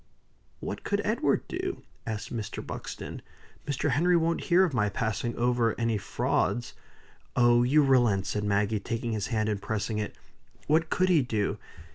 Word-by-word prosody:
"What -, -, -5 dB
could -, -, 0 dB
Edward -, -, +1 dB
do?" -, -, -4 dB, 0.2 s
asked 110 Hz, +1 st, -4 dB
Mr. 110 Hz, -3 st, -5 dB
Buxton. -, -, -6 dB, 0.5 s
"Mr. 145 Hz, 0 st, 0 dB
Henry 175 Hz, +6 st, +4 dB
won't 165 Hz, 0 st, 0 dB
hear 180 Hz, +2 st, +5 dB
of 175 Hz, -6 st, 0 dB
my 105 Hz, -4 st, +2 dB
passing 110 Hz, +3 st, -2 dB
over 120 Hz, -2 st, +1 dB
any 115 Hz, -2 st, +1 dB
frauds." -, -, -1 dB, 0.6 s
"Oh, 120 Hz, -1 st, +5 dB
you 145 Hz, +5 st, +4 dB
relent!" 120 Hz, -8 st, +3 dB
said 105 Hz, +1 st, -2 dB
Maggie, 105 Hz, +1 st, +1 dB
taking 115 Hz, +3 st, -3 dB
his 105 Hz, -4 st, -2 dB
hand, 110 Hz, -3 st, 0 dB
and 105 Hz, -2 st, -1 dB
pressing 105 Hz, +1 st, -2 dB
it. 105 Hz, -, -4 dB, 0.5 s
"What 160 Hz, +2 st, +2 dB
could 185 Hz, 0 st, +2 dB
he 170 Hz, -5 st, +5 dB
do? 110 Hz, -5 st, -1 dB
115 Hz, 160 wpm, -28 LUFS, 105-140 Hz, 0.6 s, hear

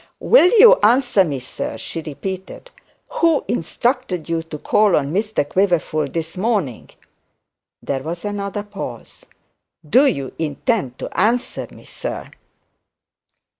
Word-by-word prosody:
'Will 470 Hz, -7 st, +6 dB
you 475 Hz, +3 st, +8 dB
answer 245 Hz, -2 st, +4 dB
me, 145 Hz, -6 st, -3 dB
sir?' 125 Hz, -2 st, -6 dB
she 165 Hz, -, -6 dB
repeated. 185 Hz, -, -7 dB, 0.4 s
'Who 335 Hz, -, +1 dB
instructed 215 Hz, -, -1 dB
you 165 Hz, -1 st, 0 dB
to 160 Hz, -2 st, -8 dB
call 210 Hz, +5 st, +3 dB
on 140 Hz, +1 st, 0 dB
Mr 210 Hz, -6 st, 0 dB
Quiverful 170 Hz, -4 st, +1 dB
this 165 Hz, +2 st, -5 dB
morning?' 190 Hz, -, -1 dB, 0.9 s
There 135 Hz, -1 st, -2 dB
was 170 Hz, +6 st, -6 dB
another 205 Hz, 0 st, -3 dB
pause. 195 Hz, -, -9 dB, 0.6 s
'Do 260 Hz, -, +5 dB
you 135 Hz, -, -2 dB
intend 155 Hz, -, -1 dB
to -, -, -7 dB
answer 235 Hz, +6 st, 0 dB
me, -, -, -15 dB
sir?' -, -, -6 dB
190 Hz, 125 wpm, -20 LUFS, 155-230 Hz, 0.9 s, you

